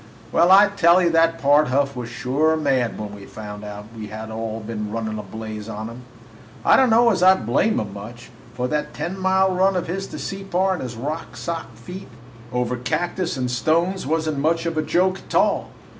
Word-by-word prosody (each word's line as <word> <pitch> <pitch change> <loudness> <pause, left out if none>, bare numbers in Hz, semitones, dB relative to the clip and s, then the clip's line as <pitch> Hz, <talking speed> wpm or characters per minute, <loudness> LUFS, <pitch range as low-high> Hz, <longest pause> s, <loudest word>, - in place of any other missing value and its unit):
"Well, 170 +2 +4
I 200 +2 +8
tell 175 -3 +4
you, 175 -2 +3
that 165 0 +3
Pard 145 +2 +4
Huff 140 +2 +1
was 120 -1 -5
sure 145 +7 +1
mad 135 -6 0
when 105 -1 -6
he 100 - -12
found 105 -1 -8
out 105 0 -7
we 105 -2 -7
all 110 +1 -5
had 110 - -9
been 105 -2 -4
running 110 -1 -3
a - - -3
blaze 110 +1 -7
on 110 +1 -5
him! 120 +2 -10 0.6
I - - +7
don't 260 -2 +5
know 230 +1 +5
as 185 -4 0
I 185 +1 +7
blame 140 - +1
him 100 -2 -5
much, 120 +5 -10 0.2
for 125 0 -1
that 150 +2 -2
ten 165 +5 -3
mile 190 0 +3
run 190 +1 +3
of 180 - -1
his 195 +3 -4
to - - -8
Separ 195 -1 -1
in 180 - -4
his 125 -3 -6 0.4
sock 165 -9 -5
feet 180 - -9 0.4
over 125 0 -1
cactus 175 +6 -2
and 125 -1 -1
stones 165 +7 +1
was 160 +1 0
n't 150 -3 -1
much 165 +3 +1
of 165 -1 -2
a 155 - +1
joke, 185 +4 +1
a - - -16
tall. - - +2
145 Hz, 210 wpm, -22 LUFS, 115-180 Hz, 0.6 s, I